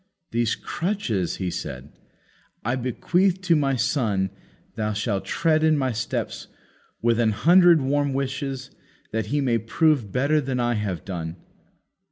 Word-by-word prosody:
These 115 -1 +1
crutches," 165 - -2
he 90 -2 -3
said, 70 -3 -6 0.7
"I 120 +3 +1
bequeath 175 - +1
to 180 -3 +3
my 140 -3 +2
son 110 -6 0 0.4
that 105 -2 -2
shall 105 -3 -1
tread 155 -2 +1
in 155 -1 +4
my 130 -2 0
steps, 110 -1 -3 0.6
with 115 0 +3
an 115 -2 +3
hundred 170 - +5
warm 140 +1 +1
wishes 135 -1 -3 0.4
that 110 0 -2
he 145 +1 0
may 120 -4 +2
prove 125 - +1
better 145 +6 +2
than 130 -2 -2
I 120 0 +1
have 105 -6 -3
done." 85 -3 -5
125 Hz, 145 wpm, -24 LUFS, 105-145 Hz, 0.7 s, hundred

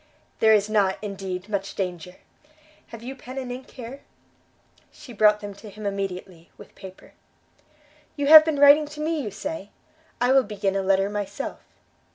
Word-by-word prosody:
"There 220 - +5
is 205 -1 +1
not, 205 -3 +1
indeed, 195 -2 -5
much 200 -2 -4
danger! 180 -2 -5 0.7
Have 230 0 -11
you 260 +3 -7
pen 255 0 -11
and 255 -2 -5
ink 255 +1 -8
here?" 255 +2 -10 0.9
She 250 - -13
brought 210 -1 +4
them 205 -1 -7
to 210 +2 -12
him 210 +1 -10
immediately, 190 -3 -5
with - - -15
paper. 190 -1 -13 1.0
"You 285 - -2
have 310 +1 +10
been 310 -2 -1
writing 285 +1 +6
to 300 +1 -11
me, 315 0 -1
you 220 - -4
say? 210 +3 -6 0.5
I 245 +1 +2
will 270 0 +6
begin 205 -3 -3
a 195 - 0
letter 195 0 +2
myself." 205 -1 -5
210 Hz, 170 wpm, -24 LUFS, 195-265 Hz, 1.0 s, have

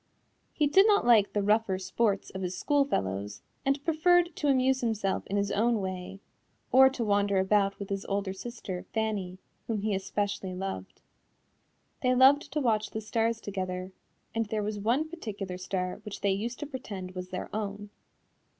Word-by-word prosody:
He 300 - +1
did 380 +9 +6
not 410 - +4
like 225 -4 +5
the 205 - 0
rougher 210 -2 +2
sports 195 +2 0
of 190 - -6
his 180 0 -3
school 290 -2 +2
fellows 100 - -3 0.2
and 275 +1 0
preferred 345 +1 +3
to 295 - -1
amuse 265 -1 +3
himself 215 -5 -1
in 200 - -1
his 200 0 0
own 225 +2 +2
way, 190 0 -5 0.5
or 265 +1 +8
to 260 -3 -3
wander 200 -1 +2
about 195 +1 +2
with 200 - -7
his 195 0 -2
older 200 -1 -1
sister, 195 -3 -7
Fanny, 205 -5 -1 0.3
whom 220 -3 -1
he 215 -1 0
especially 195 0 -2
loved. 185 - -6 1.0
They 255 0 +3
loved 270 +3 +5
to 300 - 0
watch 220 -5 +1
the 220 - -4
stars 225 +1 0
together, 185 -2 -4 0.4
and 225 -1 -1
there 215 0 -1
was 210 0 -3
one 240 +9 +1
particular 205 - -6
star 185 -1 -2
which 210 - -7
they 200 -1 +2
used 230 +5 -3
to - - -2
pretend 215 -10 -6
was 185 0 -7
their 185 +2 -5
own. 205 -1 -4
205 Hz, 175 wpm, -29 LUFS, 190-240 Hz, 1.0 s, or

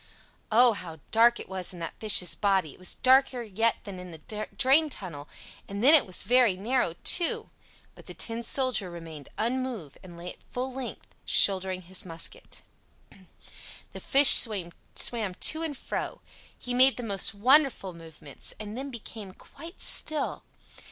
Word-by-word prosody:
Oh, 240 +2 +5
how 165 -5 -9
dark 235 +1 +4
it - - -9
was 185 -1 -4
in - - -11
that 165 -1 -6
fish's 205 -5 +3
body! 190 -7 -1
It - - -21
was 185 - -2
darker 260 -1 +3
yet 225 +2 -1
than 195 -3 -9
in 180 0 -10
the 210 +6 -8
drain 275 +4 +3
tunnel; 165 - -7 0.4
and 200 +2 -6
then 285 +5 +7
it 310 - +5
was 185 - -3
very 240 -3 +3
narrow, 220 -4 -1
too. 345 -2 +2 0.4
But - - -18
the - - -10
Tin 230 0 -4
Soldier 245 -5 -1
remained 165 -4 -11
unmoved, 235 - -4
and 175 -2 -14
lay 175 +1 -8
at - - -27
full 255 +1 -6
length, 260 -1 -8 0.2
shouldering 190 -1 +3
his 185 +2 -4
musket. 165 -2 -7 1.3
The - - -9
fish 275 +1 +6
swam 195 -7 +1 0.6
to 315 - +1
and 310 -4 -5
fro; - - -6 0.4
he 245 - -6
made 260 +2 +5
the 245 - -6
most 200 -1 0
wonderful 255 -4 +2
movements, 160 -4 -10
and 215 0 -8
then 270 +3 -6
became 220 -5 -9
quite 330 - -14
still. 305 -2 0
215 Hz, 160 wpm, -26 LUFS, 185-255 Hz, 1.3 s, then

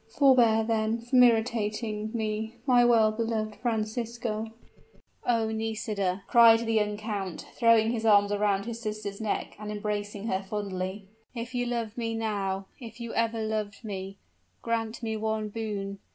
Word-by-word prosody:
Forbear, 245 -6 +5
then, 220 0 0
from 240 +2 +3
irritating 220 -2 +1
me, 220 0 -3
my 250 -3 +5
well 230 -3 +5
beloved 220 -1 -2
Francisco 225 0 -2 0.4
" - - -25
"Oh! 225 -2 +2
Nisida," 215 -4 -2
cried 230 -1 +7
the 225 -1 -1
young 210 -1 +1
count, 205 -5 -4
throwing 230 -1 +4
his 230 -2 -2
arms 205 -2 +5
around 205 -1 +1
his 230 0 -5
sister's 215 -2 -5
neck 215 - -2
and 210 0 -5
embracing 205 0 -3
her 190 -4 0
fondly; 195 -1 -4 0.3
"if 235 +2 -5
you 245 0 -1
love 230 -2 -3
me 225 -1 -2
now, 200 -3 -2
if 230 -2 -10
you 235 -1 -5
ever 230 -1 0
loved 215 -1 -3
me, 195 -1 -5 0.5
grant 230 0 -2
me 220 -1 -1
one 220 0 -2
boon! 205 -3 -4
220 Hz, 150 wpm, -28 LUFS, 210-230 Hz, 0.5 s, cried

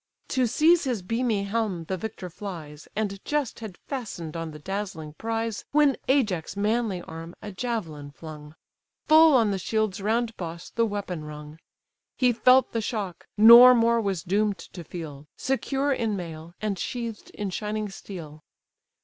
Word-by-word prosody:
To 255 -2 +2
seize 320 +7 +4
his 240 -8 -1
beamy 225 0 0
helm 200 -4 -1
the 190 +4 -3
victor 190 -2 -6
flies, 160 -6 -8
And 200 -2 -2
just 295 -4 -1
had 215 -6 -8
fastened 200 - -6
on 165 -1 -4
the 150 - -9
dazzling 175 -2 -5
prize, 225 +3 -3
When 290 -3 +5
Ajax' 205 - +1
manly 210 -3 0
arm 165 +2 -9
a 210 - -7
javelin 185 -10 -4
flung; 150 0 -11 0.5
Full 315 -1 +7
on 225 -5 +4
the 195 - -1
shield's 215 0 -1
round 225 +2 0
boss 170 -1 -7
the 230 0 +1
weapon 200 -6 -4
rung; 150 +1 -9 0.6
He 250 -2 +3
felt 255 +3 +5
the 230 - -1
shock, 205 -5 -4
nor 235 +4 +10
more 230 0 +3
was 195 -5 -2
doom'd 200 +2 +1
to 175 - -10
feel, 150 -4 -8
Secure 270 +1 0
in 225 -5 -1
mail, 165 -2 -7
and 205 -3 -2
sheath'd 235 -1 -5
in 205 -2 -3
shining 210 +2 -3
steel. 165 -6 -9
205 Hz, 160 wpm, -26 LUFS, 170-230 Hz, 0.6 s, nor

